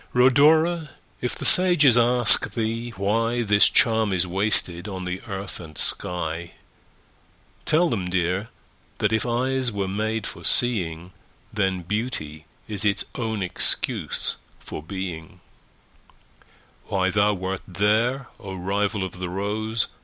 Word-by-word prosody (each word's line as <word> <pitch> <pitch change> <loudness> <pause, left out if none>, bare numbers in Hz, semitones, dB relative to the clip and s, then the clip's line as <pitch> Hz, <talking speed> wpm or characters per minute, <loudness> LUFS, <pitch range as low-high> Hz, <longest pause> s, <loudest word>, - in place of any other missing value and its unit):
Rhodora! 150 +6 +5 0.3
if 125 - -2
the - - -6
sages 175 -9 +5
ask 120 -1 +3
thee 115 +1 -1
whyThis 110 +1 +3
charm 110 -3 +3
is 90 -1 +1
wasted 90 -1 0
on 95 -3 -5
the 90 +1 -3
earth 95 -1 -6
and 80 -3 -11
sky, 85 -1 -3 1.1
Tell 165 +3 +4
them, 95 - -2
dear, 90 +4 0 0.5
that - - +1
if 110 +2 +1
eyes 130 +1 0
were 100 -2 -2
made 110 +3 -1
for - - -8
seeing, 90 -8 0 0.4
Then 95 -3 0
Beauty 85 -7 -3 0.2
is 105 -1 -4
its 100 -1 +1
own 110 -4 -2
excuse 90 - -2 0.2
for - - -7 2.0
being:Why 95 -2 0
thou 105 +1 +3
wert 95 0 -3
there, 110 +8 +1
O 95 -2 -7
rival 100 +2 -1
of 90 -1 -6
the 90 -1 -3
rose! 105 +4 -1
105 Hz, 125 wpm, -24 LUFS, 95-120 Hz, 2.0 s, Rhodora